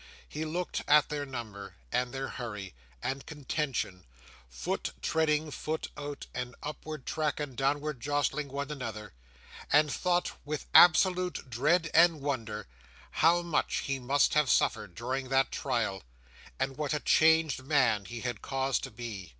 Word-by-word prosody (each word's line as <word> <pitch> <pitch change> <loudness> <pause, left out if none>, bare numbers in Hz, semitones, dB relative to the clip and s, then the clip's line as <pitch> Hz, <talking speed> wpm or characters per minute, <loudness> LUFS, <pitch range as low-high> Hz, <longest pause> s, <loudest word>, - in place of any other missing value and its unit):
He 155 +1 -4
looked 175 +3 -2
at 150 0 +5
their 145 -1 -3
number, 105 -7 -7 0.2
and 125 0 0
their 135 +1 -3
hurry, 105 - -6 0.3
and 135 +1 -2
contention—foot 90 - -4
treading 155 -1 +1
foot 155 +2 -3
out, 145 -1 -6
and 125 0 -4
upward 150 -1 -6
track 155 -2 -1
and 145 -4 -4
downward 145 0 -1
jostling 145 +2 0
one 140 +2 -4
another—and 110 - -2
thought, 180 -1 +1
with 150 0 -4
absolute 180 -1 +5
dread 155 +7 +2
and 165 -1 +6
wonder, 115 -7 -3 0.5
how 170 +2 +4
much 170 -3 0
he 135 -1 -1
must 135 +3 +2
have 150 -3 +3
suffered 100 -4 +1
during 130 +4 -3
that 135 0 +2
trial, 115 -7 -1 0.6
and 135 0 -1
what 150 -1 -1
a - - 0
changed 160 -4 +4
man 125 -8 +2
he 120 +2 -7
had 120 -3 -3
cause 135 -1 0
to - - -6
be. 105 -7 -7
135 Hz, 140 wpm, -30 LUFS, 120-150 Hz, 0.6 s, and